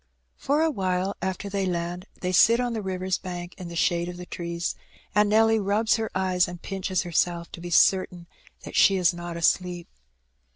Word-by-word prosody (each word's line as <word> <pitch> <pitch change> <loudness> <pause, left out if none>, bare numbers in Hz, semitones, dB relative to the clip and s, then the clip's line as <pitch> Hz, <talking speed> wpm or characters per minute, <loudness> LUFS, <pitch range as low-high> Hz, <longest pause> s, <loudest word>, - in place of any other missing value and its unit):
For 290 +3 +1
awhile 190 - 0
after 190 +2 -3
they 195 -1 -1
land 175 +1 -3
they 180 - -1
sit 230 +6 +5
on 245 -1 -1
the 220 - -3
river's 185 -1 -2
bank 175 -1 -7
in 180 - -6
the 170 - -8
shade 170 0 +1
of 175 - -7
the 180 - -8
trees, 170 -1 -4 0.4
and 210 +1 +3
Nelly 225 +1 +4
rubs 210 +3 +2
her 220 -1 -2
eyes 185 -1 +2
and 175 0 -8
pinches 190 0 -2
herself, 170 0 -1
to 170 - -9
be 175 - -6
certain 180 0 +3 0.4
that - - -8
she 195 - +5
is 180 -1 +3
not 175 -1 -6
asleep. 175 +1 0
185 Hz, 190 wpm, -25 LUFS, 175-200 Hz, 0.4 s, sit